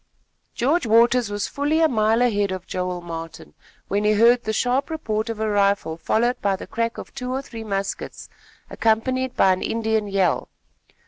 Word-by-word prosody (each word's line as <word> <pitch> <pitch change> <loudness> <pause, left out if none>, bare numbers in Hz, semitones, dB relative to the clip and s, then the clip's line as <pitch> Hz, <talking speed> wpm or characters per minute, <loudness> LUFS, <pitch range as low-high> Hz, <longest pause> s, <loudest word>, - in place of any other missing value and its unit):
George 275 +3 +1
Waters 235 +1 +4
was 205 0 -2
fully 290 +3 0
a 325 - +5
mile 225 -2 +2
ahead 205 -5 +1
of 185 -1 -5
Joel 180 -1 -3
Martin, 165 - -8 0.3
when 205 +2 0
he 210 0 +3
heard 235 +3 +4
the 220 - 0
sharp 250 +6 0
report 220 -9 -2
of 225 -2 -4
a 220 - 0
rifle 200 -5 +1
followed 235 +8 0
by 200 -1 +1
the - - -8
crack 230 0 -2
of - - -9
two 250 -2 -5
or 265 +1 -2
three 230 -4 -8
muskets, 195 -2 -4 0.4
accompanied 255 +3 0
by 190 - +4
an 185 - -4
Indian 220 -2 -1
yell. 195 -4 0
220 Hz, 180 wpm, -23 LUFS, 200-245 Hz, 0.4 s, a